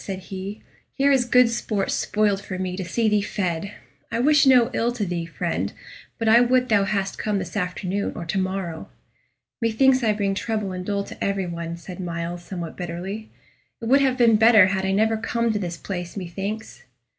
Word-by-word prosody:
said 195 -2 -4
he; 190 +2 -7 0.4
"here 280 +1 +3
is 260 -3 +3
good 250 0 +5
sport 215 -3 -1
spoiled 205 -2 +1
for 185 -2 -5
me 185 -1 -3
to 190 - -4
see 220 +6 0
thee 210 -1 +3
fed. 190 -2 -2 0.4
I 230 - -1
wish 290 +2 +4
no 250 -3 +5
ill 235 +1 +1
to 225 -4 -2
thee, 170 -2 -3
friend, 165 - -2 0.5
but 225 - -2
I 230 +2 +7
would 250 +1 +2
thou 205 -3 +4
hadst 195 -1 -2
come 210 -2 0
this 180 -3 -5
afternoon 185 +1 -2
or 170 - -5
to 170 +4 -1
morrow." 185 -3 -3 0.7
"Methinks 255 +3 +3
I 215 -2 +3
bring 200 -2 0
trouble 210 -1 -2
and 180 0 -5
dole 200 +1 -1
to - - -8
every 200 -1 0
one," 170 -1 -5
said 180 +1 -10
Myles, 170 0 -4
somewhat 175 -3 -6
bitterly. 185 +5 -5 0.5
"It 230 - -7
would 275 +2 +5
have 260 -2 +2
been 230 -3 +5
better 220 -2 +7
had 190 -1 -1
I - - +1
never 220 +3 +2
come 230 0 0
to 210 - -1
this 175 -3 -4
place, 175 -1 -6
methinks." 195 +4 -5
200 Hz, 200 wpm, -23 LUFS, 180-225 Hz, 0.7 s, I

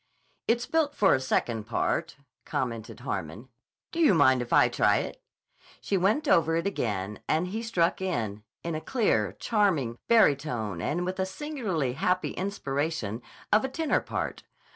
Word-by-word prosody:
"It's 240 +1 +2
built 310 -3 +1
for 195 - +4
a - - +3
second 120 -4 -1
part," 115 - -1 0.3
commented 115 -4 -4
Harmon. 95 +11 -5 0.4
"Do 335 - -4
you 300 - +5
mind 130 -4 +5
if 120 - -6
I - - +6
try - - +3
it?" - - -4 0.4
So - - -27
she 200 - -1
went 210 - +2
over 165 - +4
it 165 - 0
again, 105 - -2
and 165 +4 +1
he 220 +4 -3
struck 185 -7 +1
in, 110 - -2 0.2
in 170 - -3
a 155 - -3
clear, 110 - +1
charming 155 - 0
barytone, 140 - +2
and 175 - -1
with 185 +1 -4
a 190 - +1
singularly 190 - -2
happy 180 +7 0
inspiration 145 - -2 0.3
of 215 - +5
a 265 - -1
tenor 315 +4 +1
part. - - -4
165 Hz, 165 wpm, -28 LUFS, -, 0.4 s, I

